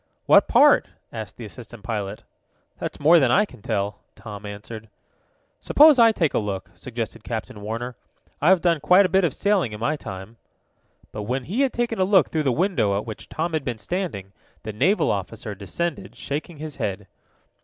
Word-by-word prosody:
"What - - +6
part?" - - +5 0.3
asked 110 -4 -7
the 115 - -7
assistant 115 0 -11
pilot. 105 -3 -4 0.6
"That's - - -5
more 165 +4 +6
than 130 -4 +3
I 210 - +4
can 155 - -16
tell," 100 +1 -2 0.2
Tom 105 -2 -9
answered. 110 +2 -9 0.7
"Suppose 300 -2 +6
I 230 -1 +7
take 165 -8 0
a - - +2
look?" 100 -3 -4
suggested 115 -3 -6
Captain 110 -3 -5
Warner. 115 +4 -5 0.5
"I've 175 +3 +5
done 170 -3 +2
quite 180 +7 +5
a - - 0
bit 190 0 +4
of 170 - +2
sailing 190 - 0
in 105 - -7
my 150 +7 0
time." 95 -3 -9 0.7
But, 105 - -6
when 130 +1 -1
he 200 - -2
had 270 -2 +2
taken 235 -2 -1
a - - +4
look 190 -1 +4
through 160 - 0
the - - +2
window 140 - +1
at 105 - -4
which 110 -2 -8
Tom 165 +1 -3
had 155 -3 -1
been 125 -4 -3
standing, 110 - -4 0.3
the 110 - -5
naval 170 - +2
officer 105 +2 -4
descended, 100 - -4
shaking 150 +5 -5
his 155 0 -7
head. 100 0 -3
120 Hz, 185 wpm, -23 LUFS, 105-175 Hz, 0.7 s, I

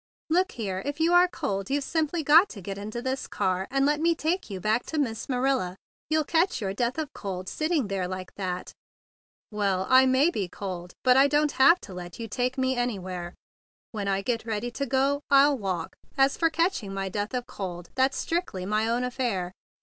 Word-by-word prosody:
"Look 365 +3 +2
here; 195 -5 -3
if 285 +2 -4
you 330 +2 +3
are 355 +1 +7
cold, 205 - -3
you've 280 +1 0
simply 320 +1 -1
got 320 +7 +6
to 205 - -9
get 195 +2 -6
into 215 +4 -5
this 260 0 -2
car 185 0 -1
and 275 0 +2
let 295 +1 +2
me 335 +1 +2
take 335 +2 -1
you 195 -2 -5
back 215 +5 +1
to 320 - -4
Miss 240 -6 -2
Manila. 255 -8 0 0.3
You'll 310 0 +2
catch 335 +1 +1
your 195 -4 -2
death 240 +6 -1
of 310 -3 -4
cold 185 -2 -5
sitting 310 - 0
there 195 -2 -2
like 185 0 -6
that." 180 -2 -4 0.8
"Well, 200 -3 0
I 260 0 +7
may 265 +6 +4
be 200 - -2
cold; 180 -2 -6
but 255 0 +5
I 275 +1 +7
don't 295 +1 +2
have 335 +8 +6
to 190 - -10
let 175 -1 -8
you 230 - -4
take 250 +3 -1
me 260 0 +1
anywhere. 185 -7 -3 0.6
When 205 -3 -4
I 195 0 0
get 230 +1 -1
ready 225 +1 -3
to 275 +3 -3
go, 275 +3 +1
I'll 280 +1 +6
walk. 185 -8 -3 0.2
As 270 0 +4
for 330 - +2
catching 320 - -1
my 195 0 -2
death 205 +5 -3
of 245 -1 -2
cold, 180 -8 -7
that's 265 +1 +2
strictly 330 - -2
my 215 +3 +1
own 235 +2 0
affair. 240 -8 -2
245 Hz, 205 wpm, -27 LUFS, 195-285 Hz, 0.8 s, are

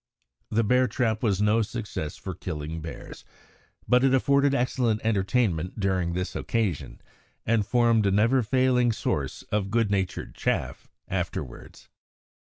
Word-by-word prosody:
The 115 +2 +1
bear 125 +4 +3
trap 110 -2 -1
was 105 -3 +1
no 105 +2 +3
success 105 -8 -5
for 95 - -6
killing 80 -1 -5
bears, 80 +1 -9 0.6
but 125 +1 +4
it 135 0 +4
afforded 140 +1 +3
excellent 120 -3 +1
entertainment 100 -4 0
during 95 -3 0
this 90 +2 -3
occasion, 105 - -2 0.4
and 115 -2 +2
formed 115 -4 +3
a - - +2
never 115 +6 +3
failing 125 0 +2
source - - -3
of 105 -2 0
good 110 -1 +1
natured 95 -2 -2
chaff - - -2 0.2
afterwards. - - -5
110 Hz, 135 wpm, -26 LUFS, 95-125 Hz, 0.6 s, but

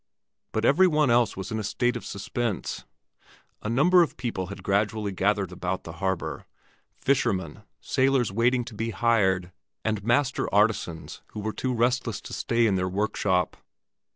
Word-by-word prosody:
But 110 +1 0
every 185 +9 +5
one 150 -6 +3
else 120 -4 +3
was 95 - -5
in 110 - -1
a - - -3
state 120 +4 0
of 120 - -5
suspense. 105 +1 -3 0.8
A 105 - -3
number 170 +10 +5
of 170 - 0
people 115 -7 -3
had 100 - -9
gradually 105 +1 0
gathered 95 0 0
about 90 +1 -3
the 80 - -7
harbor 95 -2 -2 0.5
—fishermen, 105 -9 0 0.2
sailors 130 -4 +1
waiting 120 +3 +2
to 120 - -9
be 115 +2 -3
hired, 95 -6 +2 0.3
and 110 -2 -1
master 125 +5 +1
artisans 100 -6 0
who - - -5
were 110 +1 -3
too 130 - -2
restless 120 -2 0
to - - -9
stay 115 -1 +1
in 100 -4 +2
their 90 0 0
workshop. 95 -2 0
110 Hz, 160 wpm, -26 LUFS, 95-120 Hz, 0.8 s, every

